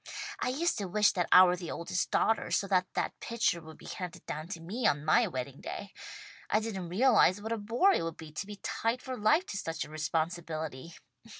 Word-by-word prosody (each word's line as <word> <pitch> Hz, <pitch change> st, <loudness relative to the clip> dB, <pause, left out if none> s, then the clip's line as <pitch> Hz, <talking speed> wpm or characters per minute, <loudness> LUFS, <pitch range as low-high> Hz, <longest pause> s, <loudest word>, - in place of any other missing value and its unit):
I -, -, 0 dB
used 300 Hz, +1 st, 0 dB
to 200 Hz, -, -3 dB
wish 210 Hz, +3 st, +4 dB
that 175 Hz, -3 st, -1 dB
I 185 Hz, -, +10 dB
were 180 Hz, -1 st, +4 dB
the 175 Hz, -2 st, -7 dB
oldest 180 Hz, +2 st, -2 dB
daughter, 225 Hz, -, +1 dB
so -, -, +1 dB
that 185 Hz, -2 st, +3 dB
that -, -, -1 dB
pitcher 225 Hz, -7 st, 0 dB
would 160 Hz, 0 st, -12 dB
be -, -, -15 dB
handed 180 Hz, -1 st, -7 dB
down 155 Hz, +2 st, -5 dB
to 170 Hz, -2 st, -6 dB
me 210 Hz, +8 st, -1 dB
on 145 Hz, +1 st, +1 dB
my 155 Hz, -, +4 dB
wedding 130 Hz, +1 st, -5 dB
day. 200 Hz, -, -6 dB, 0.6 s
I 215 Hz, -, +3 dB
didn't 195 Hz, -6 st, -4 dB
realize 205 Hz, -2 st, +4 dB
what 220 Hz, +2 st, -6 dB
a 230 Hz, -, 0 dB
bore 235 Hz, -, +3 dB
it -, -, +1 dB
would 165 Hz, -1 st, -4 dB
be 160 Hz, -1 st, -10 dB
to 155 Hz, +6 st, -5 dB
be 210 Hz, -, -7 dB
tied 230 Hz, +3 st, -1 dB
for 260 Hz, -1 st, -4 dB
life 275 Hz, -, +3 dB
to 205 Hz, -, -5 dB
such 165 Hz, -4 st, -3 dB
a -, -, -14 dB
responsibility. 160 Hz, -1 st, -3 dB
185 Hz, 220 wpm, -31 LUFS, 165-220 Hz, 0.6 s, I